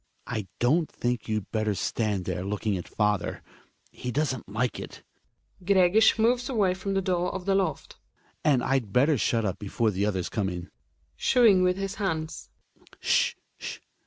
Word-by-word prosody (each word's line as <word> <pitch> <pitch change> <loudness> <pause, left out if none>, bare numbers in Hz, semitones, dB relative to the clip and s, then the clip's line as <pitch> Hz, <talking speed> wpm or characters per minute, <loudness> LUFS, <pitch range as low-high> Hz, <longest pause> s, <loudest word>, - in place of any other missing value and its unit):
I 110 -5 -4
don't 155 +7 +2
think 120 -2 -2
you'd 110 -3 -2
better 110 -2 0
stand 105 -3 -1
there 90 - -2
looking 105 +1 -1
at 90 - -5
father; 105 -2 -1 0.5
he 125 - -6
doesn't 130 -5 -1
like 115 +4 -1
it. - - -9 0.6
(Gregers 195 +3 +5
moves 240 +3 +2
away 205 -8 +2
from 195 +1 -3
the 195 - +1
door 180 -1 0
of 190 -1 -5
the 195 - +2
loft.) 185 -6 -1 0.5
And 140 -5 +3
I'd 130 -6 0
better 140 +4 +3
shut 115 0 +1
up 95 - -2
before 110 +2 0
the 100 +1 0
others 95 -4 -1
come 100 -3 -1
in. 90 0 -7 0.4
{Shooing 225 -7 +5
vHth 180 0 +3
his 195 +1 -4
hands.) 160 -5 -3 0.5
S'h! 485 0 +2 0.2
s'h - - -6
135 Hz, 165 wpm, -27 LUFS, -, 0.6 s, Gregers